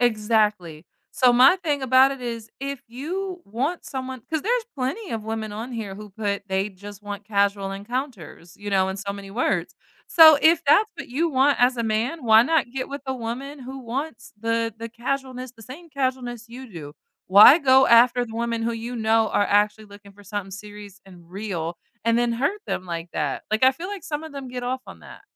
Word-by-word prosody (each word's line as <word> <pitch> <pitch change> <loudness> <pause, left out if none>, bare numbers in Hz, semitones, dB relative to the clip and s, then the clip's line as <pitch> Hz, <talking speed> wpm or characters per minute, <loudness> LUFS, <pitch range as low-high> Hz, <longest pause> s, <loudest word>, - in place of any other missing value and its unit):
Exactly. 210 -8 +1 0.3
So 250 -1 +4
my 255 +10 +6
thing 300 -6 -2
about 260 +1 +5
it 275 -1 -6
is 230 -2 -6
if 275 -1 -5
you 350 +9 -5
want 270 - -3
someone 260 -1 -6
'cause 315 -2 -1
there's 475 +1 0
plenty 290 - -4
of 220 -2 -4
women 220 -1 -4
on 225 +4 -6
here 215 -5 -5
who 210 +1 -10
put 200 0 -3
they 190 +1 0
just 205 +1 -12
want 205 0 -7
casual 200 -1 0
encounters, 205 - -6
you 205 - -7
know, 190 -1 +2
in 190 - -4
so 200 0 -4
many 200 -1 -10
words. 235 +6 -1 0.3
So 315 -2 +8
if 330 +2 +5
that's 420 +9 +4
what - - -8
you 315 +7 0
want 275 +1 +3
as 250 +1 +4
a - - 0
man, 230 +8 -1
why 220 0 +7
not 300 -2 +1
get 260 0 -4
with 280 +1 -5
a 265 - -2
woman 260 +4 -6
who 265 +1 -8
wants 240 -1 -6
the 230 0 -1
the 230 +1 -7
casualness 255 +1 -4
the 225 -2 -16
same 285 +10 -11
casualness 255 -5 -3
you 250 +1 -10
do? 155 -6 -9 0.4
Why 205 - +9
go 265 -3 +5
after 240 +1 +5
the 225 - -10
woman 230 0 -2
who 235 +1 -1
you 230 +2 -5
know 225 -1 +2
are 205 - +2
actually 210 +1 +1
looking 205 0 -15
for 205 +1 -17
something 200 -1 -5
serious 205 0 -11
and 175 -3 -16
real 180 -4 -4 0.3
and 230 0 +3
then 240 -1 +1
hurt 285 - -1
them 185 - -3
like 170 -1 -6
that? 145 -3 -2
Like, 220 +3 +2
I 260 - +6
feel 335 +7 -7
like 400 -5 -7
some 295 0 -4
of 320 - -8
them 275 -2 -7
get 250 0 -6
off 255 +1 -3
on - - -12
that. - - -13
235 Hz, 210 wpm, -23 LUFS, 205-265 Hz, 0.4 s, Why